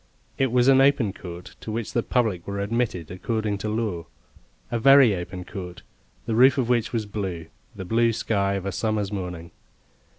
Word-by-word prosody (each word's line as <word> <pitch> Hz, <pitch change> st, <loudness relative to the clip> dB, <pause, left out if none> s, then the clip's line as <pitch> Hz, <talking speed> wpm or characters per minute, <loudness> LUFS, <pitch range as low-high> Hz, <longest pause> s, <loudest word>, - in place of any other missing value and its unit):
It 135 Hz, -3 st, +2 dB
was 125 Hz, 0 st, +3 dB
an 135 Hz, 0 st, +6 dB
open 135 Hz, -7 st, +3 dB
court, 90 Hz, -2 st, -10 dB
to 110 Hz, -, -6 dB
which 115 Hz, 0 st, -4 dB
the 120 Hz, -, +2 dB
public 110 Hz, -9 st, -1 dB
were 100 Hz, 0 st, -3 dB
admitted 100 Hz, -6 st, -2 dB
according 105 Hz, +2 st, -2 dB
to 105 Hz, -, -3 dB
law; 105 Hz, -6 st, -2 dB, 0.6 s
a 120 Hz, -, 0 dB
very 135 Hz, -3 st, +6 dB
open 90 Hz, 0 st, -6 dB
court, 90 Hz, -2 st, -8 dB, 0.4 s
the 115 Hz, -, -2 dB
roof 130 Hz, +5 st, +5 dB
of 125 Hz, -3 st, 0 dB
which 120 Hz, -2 st, +1 dB
was 115 Hz, -3 st, -2 dB
blue 95 Hz, -5 st, -4 dB, 0.3 s
the 95 Hz, -, -7 dB
blue 115 Hz, +4 st, +2 dB
sky 100 Hz, -3 st, 0 dB
of 100 Hz, -1 st, -4 dB
a 100 Hz, -, -2 dB
summer's 105 Hz, -2 st, -1 dB
morning. 90 Hz, -4 st, -5 dB
105 Hz, 185 wpm, -24 LUFS, 95-115 Hz, 0.6 s, an